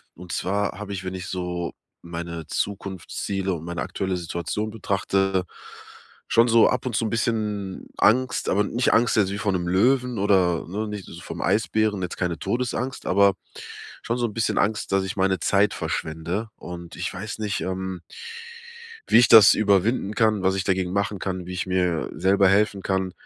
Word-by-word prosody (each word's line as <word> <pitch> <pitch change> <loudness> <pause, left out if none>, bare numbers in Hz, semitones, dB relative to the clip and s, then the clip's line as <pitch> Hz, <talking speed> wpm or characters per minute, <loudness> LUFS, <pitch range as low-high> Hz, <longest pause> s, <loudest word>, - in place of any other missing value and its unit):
Und 90 0 -10
zwar 100 +1 -1
habe 105 -1 -5
ich, 95 -1 -5
wenn 95 0 -4
ich 90 -1 -6
so 90 -2 -3 0.3
meine 85 -1 -6
Zukunftsziele 95 0 -3
und 85 -2 -6
meine 85 0 -4
aktuelle 95 -1 -2
Situation 85 +5 -3
betrachte, 95 -2 0 0.9
schon 115 +1 +5
so 115 -1 +6
ab 125 0 -1
und 125 -4 -2
zu 105 - +1
'n - - -1
bisschen 105 -4 -2
Angst, 125 +4 +2
aber 100 +2 +2
nicht 120 +4 +1
Angst 120 0 +3
jetzt 100 -3 +3
wie 100 - -3
vor 105 0 0
'nem 90 -2 -1
Löwen 125 +6 +2
oder, 95 -4 +2
ne, 105 +4 -3
nicht 105 -2 -5
so 85 - -10
vorm - - -7
Eisbären, 105 -1 +1
jetzt 90 - -4
keine 90 -3 -2
Todesangst, 125 +4 -2
aber 100 0 +4 0.7
schon 115 - -2
so 120 - 0
'n 110 - -4
bisschen 115 0 0
Angst, 105 +1 0
dass 95 0 +2
ich 95 +1 -4
meine 95 -1 +1
Zeit 100 +1 +2
verschwende. 85 +8 -3
Und 85 -1 -9
ich 90 - -4
weiß 100 +3 -6
nicht, 105 -2 -2
ähm 95 -1 -4 1.1
wie - - +6
ich 120 - +6
das 110 -3 +9
überwinden 105 +1 +2
kann, 110 -4 +2
was 95 0 +2
ich 95 -1 -1
dagegen 95 -2 0
machen 100 +1 -1
kann, 95 -1 -4
wie 90 - -6
ich 90 0 -3
mir 90 -3 0
selber 95 0 +3
helfen 100 +1 +2
kann, 95 -1 -1
95 Hz, 185 wpm, -24 LUFS, 90-105 Hz, 1.1 s, das